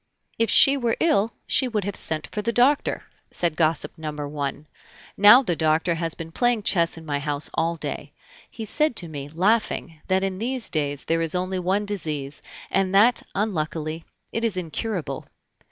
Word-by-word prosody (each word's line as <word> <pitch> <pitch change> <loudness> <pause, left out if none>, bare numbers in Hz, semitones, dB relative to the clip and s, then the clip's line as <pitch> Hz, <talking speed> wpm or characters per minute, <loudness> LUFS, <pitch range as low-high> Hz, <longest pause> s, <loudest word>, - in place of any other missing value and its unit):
"If 230 -2 +2
she 275 +1 +7
were 240 -3 0
ill, 230 -9 +2
she 265 - +2
would 215 -4 -1
have 200 +1 -4
sent 155 -1 -3
for 210 - -3
the 230 - -1
doctor," 255 +5 +2 0.3
said 170 -3 0
gossip 160 0 0
number 150 -2 -4
one; 145 0 -4 0.5
"now 210 +6 +8
the 175 -8 0
doctor 160 +2 +2
has 165 -1 -3
been 165 0 -8
playing 240 +3 +1
chess 170 -4 +2
in 165 - -10
my 145 -2 -1
house 145 0 -1
all 165 +1 0
day. - - -5 0.4
He 225 - -7
said 300 +4 +1
to 175 - -2
me, 145 -3 -7
laughing, 175 -2 0
that 190 0 +2
in 190 -1 -2
these 250 +1 -1
days 145 -3 -2
there 165 0 +1
is 165 +1 -1
only 185 +1 -1
one 190 +3 0
disease, 155 -8 -3 0.3
and 195 0 +1
that, 230 +5 +5
unluckily, 160 -5 -2 0.3
it 230 - -2
is 220 -5 0
incurable." 180 +2 -4
180 Hz, 180 wpm, -24 LUFS, 155-215 Hz, 0.5 s, now